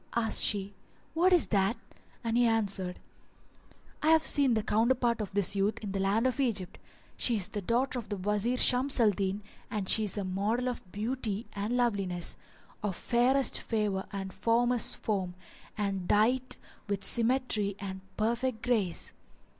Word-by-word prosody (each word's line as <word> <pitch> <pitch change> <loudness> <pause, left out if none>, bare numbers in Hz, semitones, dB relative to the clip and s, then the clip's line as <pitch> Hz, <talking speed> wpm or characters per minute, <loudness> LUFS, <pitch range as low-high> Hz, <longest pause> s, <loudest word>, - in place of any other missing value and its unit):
Asked 225 -2 +2
she, 200 -1 0 0.4
"What 350 +4 +3
is 355 -3 +5
that?" 200 +2 +1 0.5
and 230 -1 -1
he 240 0 +4
answered, 200 -5 0 1.0
"I 305 - -1
have 320 0 +5
seen 275 -5 +4
the 220 - 0
counterpart 235 +1 +1
of 205 - -5
this 200 -1 +3
youth 200 +2 0
in 205 - -4
the 195 - -2
land 200 +5 +1
of 260 +1 0
Egypt. 210 -9 -1 0.4
She 240 - +2
is 200 -4 +1
the 210 -2 -4
daughter 245 +6 0
of 230 - -10
the 205 - -3
Wazir 210 +6 0
Shams 255 +2 +3
al 220 -3 +5
Din 195 +1 -3 0.3
and 210 -4 -3
she 220 +2 +5
is 205 - -3
a 200 - -1
model 205 +7 -1
of 215 -7 -8
beauty 220 0 -2
and 210 +5 -2
loveliness, 195 -8 0 0.5
of 205 -3 -2
fairest 255 +5 +1
favour 210 -4 -2
and 195 -1 -5
formous 240 +2 +2
form, 190 -4 -3 0.4
and 195 -3 -2
dight 250 +5 +2 0.3
with 200 -1 -2
symmetry 230 -4 +1
and 190 -1 -6 0.2
perfect 235 +2 -1
grace. 220 -8 -1
215 Hz, 160 wpm, -30 LUFS, 200-245 Hz, 1.0 s, is